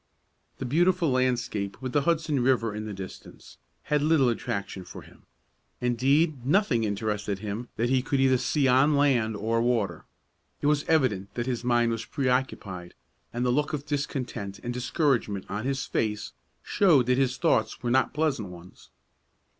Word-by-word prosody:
The 135 - -5
beautiful 170 +3 +2
landscape, 125 -6 -1
with 130 -1 -5
the 145 - +3
Hudson 155 -2 +1
River 120 -4 +2
in 110 +1 -5
the - - -5
distance, 95 -1 -10 0.2
had 150 0 +1
little 150 -4 +3
attraction 100 -4 -3
for 90 - -10
him. - - -19 0.5
Indeed, 135 +4 +1
nothing 140 - +2
interested 105 -1 -2
him 110 +4 -5
that 120 +2 0
he 130 -1 +3
could 135 +2 -1 0.2
see 135 +2 +1
either 125 0 +5
on 150 0 +3
land 120 -6 +2
or 115 +3 0
water. 115 -4 0 0.5
It - - -5
was 150 0 +2
evident 120 -12 +1
that 120 - -2
his 125 -2 -2
mind 120 -1 +2
was 115 0 -3
preoccupied, 125 -9 -2 0.4
and 120 +1 -2
the 125 - +2
look 145 +4 0
of 145 -1 -3
discontent 135 -9 -3
and 120 0 -3
discouragement 125 - 0
on 105 +4 -4
his 135 -1 -1
face 110 -1 -2 0.3
showed 160 -11 +4
that 125 +1 +2
his 130 -2 +1
thoughts 165 -4 +1
were 120 - 0
not 130 +1 +3
pleasant 150 -9 -1
ones. 90 0 -14
125 Hz, 165 wpm, -27 LUFS, 110-140 Hz, 0.5 s, either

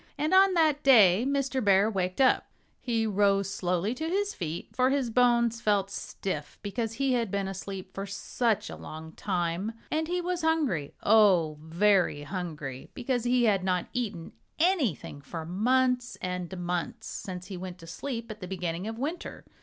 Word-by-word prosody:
And 300 +4 0
on 380 0 +6
that 310 -3 +3
day 225 -6 +6
Mr. 270 -2 0
Bear 200 0 +5
waked 185 -2 -2
up. 260 -1 +4 0.3
He 230 -3 0
rose 200 -1 +2
slowly 180 +4 0
to 315 +5 -3
his 405 +3 0
feet, 165 -2 -5
for 255 0 +3
his 270 -4 0
bones 235 -1 +3
felt 200 -2 +1
stiff 150 -7 -5
because 225 +2 -3
he 270 +2 +1
had 235 -4 0
been 200 0 -1
asleep 195 0 -6
for 195 +1 -5
such 215 +2 -1
a - - -7
long 160 +1 -9
time. 180 +3 -2 0.2
And 315 +1 0
he 355 +1 -1
was 355 0 -2
hungry 300 - 0
oh! 185 -8 +4
very 175 -2 +2
hungry, 150 -6 -6
because 245 -2 -1
he 245 0 +3
had 200 -5 +3
not 180 -1 0
eaten 210 -9 -3 0.3
anything 305 - 0
for 160 +4 -6
months 245 +7 +1
and 180 0 -4
months, 180 +6 -3
since 180 -3 -6
he 195 - -7
went 180 0 -7
to 165 - -13
sleep 230 +7 -5
at 215 - -9
the 185 - -7
beginning 180 0 -3
of 225 0 -5
winter. 300 +8 -5
205 Hz, 170 wpm, -28 LUFS, 180-250 Hz, 0.3 s, on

